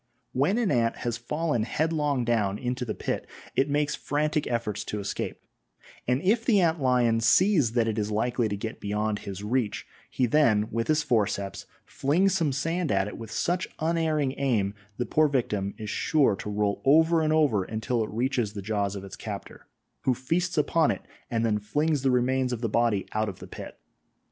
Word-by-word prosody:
When 145 - +1
an 235 -5 +1
ant 115 -3 +2
has 120 -1 0
fallen 150 +1 -1
headlong 150 +1 0
down 105 -4 +1
into 125 +1 -3
the 110 - -3
pit - - -3 0.3
it 135 +2 +2
makes 145 +1 +1
frantic 150 +1 -1
efforts 115 -3 -2
to 105 - -4
escape, 100 - -4 0.7
and 125 +4 +1
if 220 +5 +3
the 220 -4 +4
ant 165 -3 +2
lion 125 -3 +3
sees 145 - +4
that 115 -2 +2
it 110 -1 -1
is 105 0 -1
likely 115 +2 0
to 100 - -2
get 110 +2 -5
beyond 105 +1 -1
his 100 0 -7
reach, 110 0 -1 0.2
he 130 - +1
then 115 -5 +3
with 115 0 -1
his 155 -1 +2
forceps 105 -7 -1 0.2
flings 180 +8 +1
some 165 -6 +1
sand 165 +5 -1
at 95 0 +2
it 105 - -7
with 115 -2 -8
such 175 +9 -1
unerring 155 -4 +1
aim 110 -8 +1 0.2
the 125 - -1
poor 155 +4 +3
victim 105 -8 -1
is 110 - -6
sure 140 -9 +2
to 105 - -6
roll 105 -1 0
over 160 +4 +5
and 155 -1 +1
over 145 -11 +3
until 110 +3 -1
it - - -5
reaches 120 -2 -1
the 100 -2 -6
jaws 100 -1 -1
of 100 - -6
its 100 - -9
captor, - - -8 0.4
who 130 - +3
feasts 170 +8 -1
upon 155 +1 +3
it - - -2 0.3
and 115 -2 0
then 105 -2 +1
flings 145 +8 0
the 135 - +2
remains 130 +1 +1
of 120 -2 -3
the 115 - 0
body 115 -2 +1
out 110 0 0
of 95 - -8
the - - -10
pit. - - -9
125 Hz, 195 wpm, -27 LUFS, 110-150 Hz, 0.7 s, over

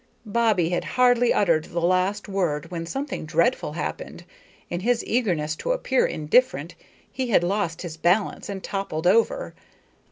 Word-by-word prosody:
Bobbie 215 -6 +2
had 175 - -1
hardly 245 -1 +4
uttered 165 -6 +2
the 170 - -4
last 185 +4 +1
word 170 -5 -2
when 165 -1 -4
something 270 - -4
dreadful 170 +10 0
happened. - - -5 0.4
In 175 - -3
his 235 +4 +1
eagerness 170 -11 0
to - - -1
appear 265 - +1
indifferent 155 - +1 0.4
he 260 -1 -3
had 205 -7 +3
lost 185 -2 -1
his 165 -3 -7
balance 185 +6 +1
and 195 -2 -5
toppled 195 -5 -4
over. 230 - +2
190 Hz, 150 wpm, -24 LUFS, 170-235 Hz, 0.4 s, hardly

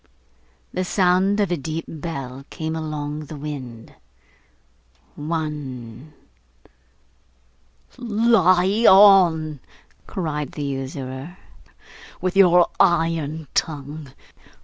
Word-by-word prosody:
The 185 - -1
sound 185 +2 +2
of 200 -4 +1
a - - +2
deep 160 +3 -5
bell 140 -5 -6
came 160 -1 -4
along 150 -1 -5
the 155 - -9
wind. 130 -6 -8 1.2
One. 150 -4 -6 1.9
'Lie 215 -3 +3
on!' 175 -7 +6 0.5
cried 150 -5 -4
the 150 - -5
usurer, 135 +3 -6 0.8
'with 185 0 -2
your 180 -3 +6
iron 165 -4 +1
tongue! 145 -1 -3
160 Hz, 80 wpm, -22 LUFS, 145-180 Hz, 1.9 s, on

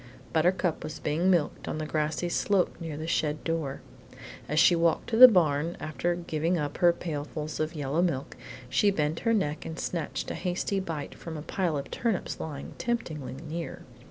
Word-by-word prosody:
Buttercup 175 +1 +2
was 155 - -5
being 160 +5 +1
milked 170 -5 +1
on - - -2
the 155 - -3
grassy 155 +3 -1
slope 185 +2 +1
near 160 -3 -5
the 155 - -4
shed 155 -2 0
door. 160 -5 -2 0.7
As 150 +2 +2
she 175 - +6
walked 165 -1 +1
to - - +2
the 255 +3 +12
barn, 165 - +2
after 170 +3 -1
giving 170 0 -1
up 145 -2 -3
her 175 -1 +6
pailfuls 155 -2 -5
of 155 +2 -1
yellow 145 +2 0
milk, 155 -7 -1 0.3
she 205 +10 +3
bent 155 -4 0
her 230 - +1
neck 155 -7 -1
and 160 - -6
snatched 170 -4 -3
a - - -2
hasty 185 +2 -1
bite 165 -6 -4
from 165 -2 -7
a 150 - -6
pile 170 -2 -1
of 140 - -6
turnips 225 -6 -1
lying 145 -3 -6
temptingly 155 - -3
near. 170 +2 -5
165 Hz, 185 wpm, -28 LUFS, 150-175 Hz, 0.7 s, the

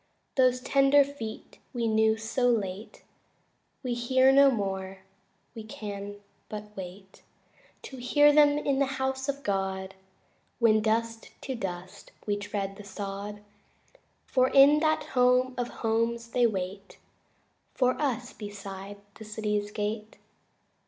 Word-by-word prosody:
Those 255 -1 +3
tender 275 +2 +5
feet 270 -6 -8
we 235 -2 -1
knew 220 0 +3
so 225 +3 0
late 205 -3 -3 0.8
We 250 -2 -1
hear 260 +2 +3
no 275 +1 +7
more; 190 -4 -3 0.5
we 225 -2 -8
can 205 -1 -7 0.3
but 210 0 -8
wait 190 +1 -10 0.6
To 265 - -9
hear 290 +4 +4
them 290 -1 +5
in 280 -2 0
the 275 - +2
House 265 +1 -2
of 280 0 -3
God 190 -1 -2 0.6
When 220 -2 +4
dust 225 +1 -1
to 265 - -4
dust 185 -5 -7
we 205 - 0
tread 200 -1 -4
the 205 - -10
sod, 200 +1 -6 0.8
For 255 -1 +2
in 280 +2 +7
that 310 0 +1
home 250 0 +3
of 245 -1 -2
homes 230 +1 -1
they 245 0 +4
wait 195 -1 -5 0.8
For 255 -1 +3
us 250 -4 -2
beside 200 -1 -8 0.2
the 220 - -11
city's 210 -1 -2
gate. 210 +1 -4
220 Hz, 130 wpm, -28 LUFS, 205-255 Hz, 0.8 s, no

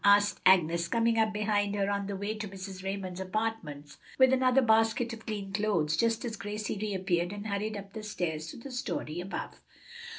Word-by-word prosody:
asked 205 0 +5
Agnes, 170 -2 +4
coming 230 +2 +2
up 220 -1 +3
behind 205 -1 0
her 200 -1 +1
on 200 -1 -1
her 200 - -3
way 200 +2 -2
to 215 -1 -5
Mrs. 190 -1 -8
Raymond's 190 -2 -4
apartments 185 -8 -3 0.2
with 260 0 +6
another 260 0 +4
basket 225 +1 +3
of 225 -1 -10
clean 200 -3 -4
clothes, 195 -7 +1
just 230 +3 +1
as 225 -2 -4
Gracie 205 +1 -4
reappeared 185 -4 0
and 205 0 -6
hurried 210 +1 -2
up 195 0 -9
the 220 - -5
stairs 165 -7 -3
to - - -8
the 265 +3 -9
story 175 -9 -3
above." 190 +2 -6
205 Hz, 190 wpm, -30 LUFS, 190-220 Hz, 0.2 s, with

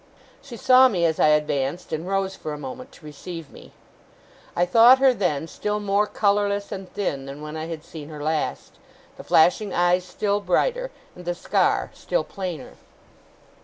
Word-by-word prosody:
She 275 -4 -10
saw 255 +3 +6
me 180 -8 0
as 160 -1 0
I - - +5
advanced, 150 +1 0
and 160 +3 -3
rose 195 0 -1
for 155 - -6
a - - -6
moment 145 - -8
to 155 - -16
receive 155 +1 -9
me. - - -14 0.8
I 175 - +2
thought 230 +7 +7
her, 265 -1 +4
then, 165 -8 -1
still 210 +4 -3
more 205 0 +1
colourless 205 -1 0
and 190 -1 -7
thin 140 -9 -3
than 140 +1 -8
when 150 +1 -7
I 160 0 -5
had 165 -2 -6
seen 155 -2 -10
her 150 -2 -8
last; 155 0 -3 0.4
the - - -9
flashing 185 +6 +3
eyes 175 +1 +2
still 200 +2 -1
brighter, - - 0 0.3
and 180 - -11
the 175 0 -3
scar - - 0
still - - -2
plainer. 180 -8 -7
180 Hz, 175 wpm, -23 LUFS, 155-205 Hz, 0.8 s, thought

